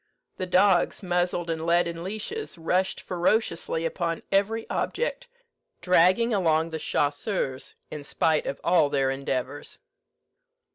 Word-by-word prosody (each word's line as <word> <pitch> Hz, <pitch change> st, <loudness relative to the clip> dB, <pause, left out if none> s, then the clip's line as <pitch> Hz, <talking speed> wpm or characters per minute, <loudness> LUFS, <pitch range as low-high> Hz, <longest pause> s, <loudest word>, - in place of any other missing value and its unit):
The 185 Hz, -, -3 dB
dogs, 185 Hz, +1 st, +3 dB
muzzled 175 Hz, -1 st, 0 dB
and 160 Hz, -1 st, -3 dB
led 170 Hz, +1 st, +3 dB
in 170 Hz, 0 st, -5 dB
leashes, 215 Hz, -, -5 dB
rushed 180 Hz, +3 st, 0 dB
ferociously 175 Hz, -3 st, 0 dB
upon 165 Hz, 0 st, -2 dB
every 205 Hz, +3 st, +1 dB
object, -, -, -2 dB, 0.5 s
dragging 185 Hz, +6 st, +4 dB
along 165 Hz, -4 st, +2 dB
the 160 Hz, -1 st, -4 dB
chasseurs 145 Hz, -1 st, -2 dB, 0.2 s
in 150 Hz, -, -6 dB
spite 155 Hz, +2 st, +1 dB
of 140 Hz, -, -3 dB
all 170 Hz, -4 st, +4 dB
their 135 Hz, -2 st, +1 dB
endeavours. 135 Hz, +1 st, -4 dB
175 Hz, 125 wpm, -26 LUFS, 160-190 Hz, 0.5 s, dragging